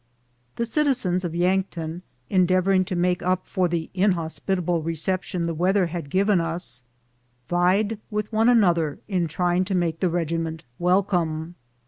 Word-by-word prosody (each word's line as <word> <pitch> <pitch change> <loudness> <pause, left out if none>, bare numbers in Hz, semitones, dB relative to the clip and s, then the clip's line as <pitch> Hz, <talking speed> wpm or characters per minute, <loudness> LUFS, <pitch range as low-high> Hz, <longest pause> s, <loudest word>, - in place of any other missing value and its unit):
The 235 - -1
citizens 235 - +1
of 170 -2 -3
Yankton, 175 -2 -1 0.3
endeavoring 185 +1 +3
to 185 -1 -3
make 180 0 +1
np 185 +1 0
for 185 -1 0
the 170 -2 -3
inhospitable 180 -2 0
reception 170 +2 -2
the 170 - -1
weatlier 180 +2 +2
had 165 -4 -5
given 195 +1 +2
us, 165 -6 -1 0.7
vied 195 +5 +1
with 210 +1 -3
one 225 +2 +4
another 175 -10 +3
in 180 -4 0
trying 175 +3 +1
to 195 0 -2
make 170 -2 0
tlie 180 -3 +1
regiment 165 -1 -2 0.2
welcome. 175 -3 +1
180 Hz, 140 wpm, -24 LUFS, 170-190 Hz, 0.7 s, one